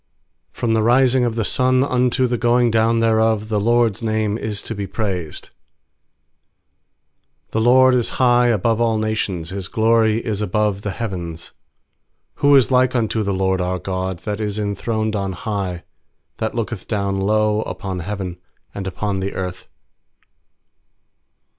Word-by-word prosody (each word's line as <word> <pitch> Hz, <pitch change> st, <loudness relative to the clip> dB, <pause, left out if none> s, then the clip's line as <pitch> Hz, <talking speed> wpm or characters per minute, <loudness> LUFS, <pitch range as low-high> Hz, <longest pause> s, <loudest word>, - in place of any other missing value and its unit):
3From 115 Hz, -2 st, 0 dB
the 110 Hz, -, +2 dB
rising 125 Hz, +2 st, +3 dB
of 115 Hz, -2 st, -1 dB
the 115 Hz, -2 st, -1 dB
sun 130 Hz, +2 st, +2 dB
unto 125 Hz, -1 st, +1 dB
the 120 Hz, -1 st, -1 dB
going 120 Hz, 0 st, +3 dB
down 115 Hz, +1 st, +2 dB
thereof 110 Hz, -1 st, +2 dB
The 105 Hz, -2 st, +1 dB
LORD'S 115 Hz, -1 st, +2 dB
name 110 Hz, -2 st, 0 dB
is 105 Hz, -2 st, -3 dB
to -, -, -5 dB
be 100 Hz, -2 st, -4 dB
praised. 95 Hz, -9 st, -4 dB, 2.0 s
4The 110 Hz, -, 0 dB
LORD 130 Hz, +2 st, +6 dB
is 125 Hz, -2 st, +1 dB
high 125 Hz, -1 st, +4 dB
above 115 Hz, 0 st, +1 dB
all 115 Hz, -2 st, +2 dB
nations, 105 Hz, -6 st, -2 dB
His 95 Hz, -1 st, -4 dB
glory 110 Hz, 0 st, +2 dB
is 110 Hz, -2 st, -3 dB
above 105 Hz, 0 st, 0 dB
the 105 Hz, -, -3 dB
heavens. 90 Hz, -6 st, -5 dB, 0.9 s
5Who 145 Hz, 0 st, +6 dB
is 135 Hz, 0 st, +3 dB
like 130 Hz, 0 st, +3 dB
unto 110 Hz, -2 st, 0 dB
the 100 Hz, -1 st, -1 dB
LORD 95 Hz, -1 st, 0 dB
our 90 Hz, +1 st, -1 dB
God, 95 Hz, +1 st, -3 dB
That 105 Hz, 0 st, -3 dB
is 105 Hz, -1 st, -2 dB
enthroned 110 Hz, +1 st, -2 dB
on 100 Hz, -2 st, -2 dB
high, 95 Hz, -2 st, -4 dB, 0.6 s
6That 110 Hz, 0 st, -2 dB
looketh 115 Hz, -3 st, -4 dB
down 100 Hz, -2 st, -1 dB
low 105 Hz, +2 st, +1 dB
Upon 95 Hz, -4 st, -5 dB
heaven 90 Hz, -1 st, -5 dB, 0.3 s
and 100 Hz, -1 st, -5 dB
upon 100 Hz, +1 st, -2 dB
the 95 Hz, +1 st, -4 dB
earth? 90 Hz, 0 st, -5 dB
110 Hz, 150 wpm, -20 LUFS, 100-115 Hz, 2.0 s, LORD